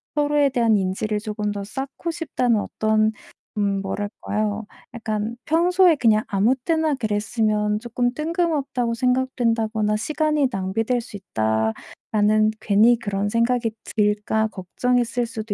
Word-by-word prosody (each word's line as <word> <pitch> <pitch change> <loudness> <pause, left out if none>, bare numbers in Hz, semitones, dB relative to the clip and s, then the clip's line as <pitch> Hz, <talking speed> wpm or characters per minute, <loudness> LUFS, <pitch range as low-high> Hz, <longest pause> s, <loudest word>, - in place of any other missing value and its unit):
서로에 295 -1 +3
대한 235 -5 +2
인지를 200 +3 -1
쪼금 210 -1 -3
더 200 -1 -5
쌓고 270 - -5
싶다는 255 -9 0
어떤 215 0 +1 0.5
음 200 -1 0
뭐랄까요? 205 +1 -3 0.3
약간 220 -1 -3
평소에 350 +2 +4
그냥 220 -4 +3
아무 210 +6 +2
때나 315 +3 0
그랬으면 210 -2 0
쪼끔 245 +1 -1
뜬금없다고 305 -6 -1
생각된다거나 230 -4 0
'시간이 300 +4 +1
낭비될 225 +4 -1
수 225 -3 -9
있다.'라는 195 - 0
괜히 220 +4 +4
그런 205 -3 -2
생각이 230 +1 +1 0.3
들까 210 +1 +1
걱정했을 240 +5 -1
수도 225 -2 -5
225 Hz, 295 characters per minute, -22 LUFS, 210-250 Hz, 0.5 s, 평소에